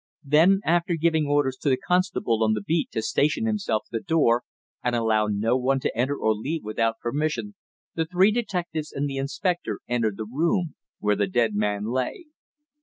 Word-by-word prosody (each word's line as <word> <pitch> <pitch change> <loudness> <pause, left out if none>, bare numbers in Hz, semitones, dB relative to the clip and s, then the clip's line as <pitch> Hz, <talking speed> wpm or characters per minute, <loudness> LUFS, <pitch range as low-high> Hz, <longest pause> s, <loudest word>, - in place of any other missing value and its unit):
Then, 165 +7 +4
after 170 +1 +2
giving 160 -2 +1
orders 145 -2 +1
to 145 - -1
the 130 - +3
constable 180 - +1
on 110 0 +3
the 105 - -2
beat 160 +7 0
to 110 - -1
station 150 - +1
himself 210 - 0
at - - -33
the 115 - -1
door 120 -5 +2 0.4
and 125 -1 0
allow 110 -2 +2
no 105 +3 +1
one 130 +1 +1
to - - -2
enter 130 +5 0
or 110 - +2
leave 145 +10 -4
without 115 +1 -1
permission, 155 - -2 0.4
the 160 - -1
three 185 +4 +4
detectives 175 -9 -3
and 145 +1 -2
the 135 -1 -4
inspector 175 +6 -2
entered 115 -4 0
the 110 - -4
room 165 - 0 0.2
where 105 0 +1
the 100 0 0
dead 110 +3 +1
man 105 0 -1
lay. 130 - -2
135 Hz, 185 wpm, -25 LUFS, 115-165 Hz, 0.4 s, Then